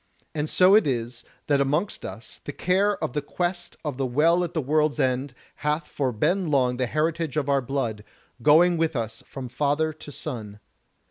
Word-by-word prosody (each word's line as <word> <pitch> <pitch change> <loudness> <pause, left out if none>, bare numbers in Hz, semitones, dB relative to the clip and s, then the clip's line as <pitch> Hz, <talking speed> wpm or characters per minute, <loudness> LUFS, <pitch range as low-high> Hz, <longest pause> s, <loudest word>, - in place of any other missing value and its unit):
And 150 0 -2
so 185 +1 +6
it 215 -6 +6
is, 120 -2 -2 0.2
that 140 -2 +2
amongst 150 +9 0
us 105 +5 -9
the - - -5
care 195 +6 +1
of - - -2
the 150 - -1
Quest 175 +4 -3
of 145 -4 -3
the 135 - 0
Well 165 +8 +3
at 175 0 -5
the - - +2
World's 150 +2 +1
End 130 0 0 0.2
hath 150 +1 -1
for 140 - -2
long 110 - -12
been 150 - +2
the 130 -1 0
heritage 155 +1 -1
of 145 -2 0
our 140 -1 +3
blood, 120 -5 -2 0.4
going 165 +5 +5
with 160 -1 0
us 115 -1 -3
from 135 -2 -7
father 150 +5 0
to 150 -1 -11
son. 110 -9 -6
145 Hz, 190 wpm, -25 LUFS, 125-160 Hz, 0.4 s, so